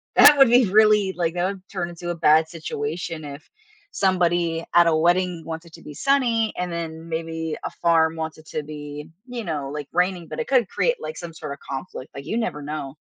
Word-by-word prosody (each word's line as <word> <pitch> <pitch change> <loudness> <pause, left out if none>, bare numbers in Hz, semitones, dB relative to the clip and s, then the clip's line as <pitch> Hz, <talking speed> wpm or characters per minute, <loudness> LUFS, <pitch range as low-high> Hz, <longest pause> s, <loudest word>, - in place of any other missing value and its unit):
that 295 -1 +9
would 270 -3 +7
be 245 0 +6
really, 210 -2 +5
like, 170 -2 -1
that 175 +1 +1
would 195 -1 -3
turn 175 -3 -3
into 175 0 -7
a 175 - -1
bad 160 -1 +4
situation 160 0 -4
if 145 +1 -9 0.4
somebody 175 - +1
at 175 0 +8
a 160 - +3
wedding 175 +1 +2
wants 165 +1 -6
it 165 - -17
to - - -12
be 150 - -10
sunny 235 - +1
and 180 -1 -2
then 165 -1 -5
maybe 160 -1 -3
a - - -2
farm 165 -1 +2
wants 160 0 -4
it 155 - -16
to 155 - -4
be, 150 0 -8 0.2
you 245 -2 -5
know, 145 -4 -3
like, 150 -2 -5
raining, 180 -1 0
but - - -6
it 475 - -2
could 250 -7 +3
create, - - +1
like, 475 - -6
some 170 -1 -7
sort 150 -3 -6
of 140 - -12
conflict, 135 -1 -6
like, 140 0 -8
you 225 - -2
never 220 -11 -2
know. 145 -1 -5
170 Hz, 220 wpm, -23 LUFS, 155-190 Hz, 0.4 s, that